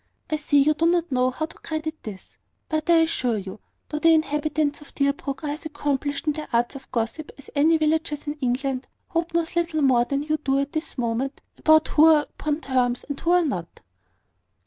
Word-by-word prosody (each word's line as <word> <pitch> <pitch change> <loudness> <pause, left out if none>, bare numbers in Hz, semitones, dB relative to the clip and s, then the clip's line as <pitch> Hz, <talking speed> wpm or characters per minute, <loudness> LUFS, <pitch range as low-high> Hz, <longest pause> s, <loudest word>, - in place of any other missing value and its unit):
I - - +2
see 290 -1 +3
you 305 +2 +3
do 330 +2 +1
not 345 -2 +1
know 255 0 +2
how 285 +5 -3
to - - -15
credit 315 0 -4
this; 200 -4 -10 0.3
but 310 +2 -2
I 335 -1 +6
assure 250 -8 0
you, 195 +1 -7 0.3
though 300 - -3
the 330 +1 +5
inhabitants 300 -1 0
of 295 - -15
Deerbrook 280 0 -1
are 295 - -1
as 310 +2 -5
accomplished 285 -1 -2
in 300 - +2
the 305 0 -6
arts 240 +3 +1
of 265 - -11
gossip 235 +6 -2
as 280 - -14
any 315 +3 +4
villagers 310 -1 0
in 295 - -2
England, 260 +1 -1 0.2
Hope 335 0 -2
knows 335 0 0
little 330 -3 0
more 250 -3 +4
than 275 +2 -1
you 310 +1 0
do 275 -2 0
at 280 +1 -1
this 315 -1 -4
moment 245 +3 -2
about 315 0 +4
who 310 - +5
are 310 -2 +6
upon 300 +1 -4
terms 250 -3 0
and 285 - -4
who 335 - -2
are 355 -1 +4
not." 180 - -4
295 Hz, 210 wpm, -24 LUFS, 265-315 Hz, 0.3 s, I